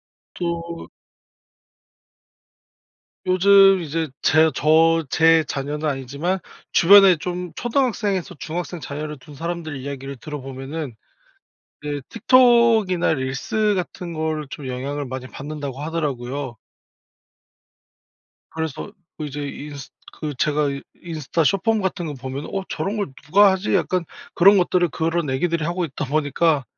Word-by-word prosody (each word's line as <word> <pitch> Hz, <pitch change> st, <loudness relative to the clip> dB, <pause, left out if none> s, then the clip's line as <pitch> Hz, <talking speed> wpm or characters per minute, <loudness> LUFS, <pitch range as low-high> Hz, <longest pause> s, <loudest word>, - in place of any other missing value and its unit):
요것도 170 Hz, -1 st, -6 dB, 2.4 s
요즘 195 Hz, +1 st, +6 dB
이제 160 Hz, +1 st, -2 dB
제 160 Hz, +1 st, +5 dB
저 165 Hz, +2 st, +4 dB
제 160 Hz, +2 st, +4 dB
자녀는 150 Hz, +2 st, -3 dB
아니지만 140 Hz, +7 st, -2 dB, 0.3 s
주변에 195 Hz, +1 st, +8 dB
좀 180 Hz, +1 st, -5 dB
초등학생에서 210 Hz, -, -1 dB
중학생 175 Hz, +1 st, -4 dB
자녀를 150 Hz, +1 st, -5 dB
둔 145 Hz, -, -13 dB
사람들의 165 Hz, -2 st, -4 dB
이야기를 140 Hz, 0 st, -6 dB
들어보면은 135 Hz, 0 st, -6 dB, 0.9 s
네, 145 Hz, -1 st, -3 dB
"틱톡이나 230 Hz, -7 st, +4 dB
릴스 140 Hz, +10 st, -1 dB
같은 180 Hz, -1 st, -4 dB
거를 155 Hz, -2 st, -2 dB
좀 140 Hz, -2 st, -7 dB
영향을 140 Hz, +3 st, -4 dB
많이 130 Hz, 0 st, -6 dB
받는다."고 140 Hz, -1 st, -6 dB
하더라고요. 140 Hz, -5 st, -3 dB, 1.9 s
그래서 160 Hz, +4 st, -5 dB, 0.3 s
그 155 Hz, -, -4 dB
이제 145 Hz, 0 st, -5 dB
인스 145 Hz, -1 st, -8 dB, 0.2 s
그 150 Hz, -2 st, -5 dB
제가 150 Hz, 0 st, +1 dB
이 140 Hz, 0 st, -5 dB, 0.2 s
인스타 165 Hz, -1 st, -2 dB
숏폼 215 Hz, +6 st, +2 dB
같은 190 Hz, -2 st, -2 dB
거 150 Hz, -, -4 dB
보면은 130 Hz, +2 st, -6 dB
'어 195 Hz, -, -1 dB
저런 200 Hz, +3 st, -3 dB
걸 200 Hz, -10 st, -3 dB
누가 200 Hz, +7 st, +6 dB
하지?' 190 Hz, +2 st, -1 dB
약간 185 Hz, -1 st, +1 dB, 0.3 s
그런 195 Hz, +3 st, +7 dB
것들을 180 Hz, -1 st, +2 dB
그런 165 Hz, +1 st, -1 dB
아기들이 165 Hz, +4 st, 0 dB
하고 175 Hz, +2 st, -1 dB
있다 150 Hz, 0 st, -4 dB
보니까. 145 Hz, +1 st, +1 dB
160 Hz, 280 characters per minute, -22 LUFS, 145-180 Hz, 2.4 s, 주변에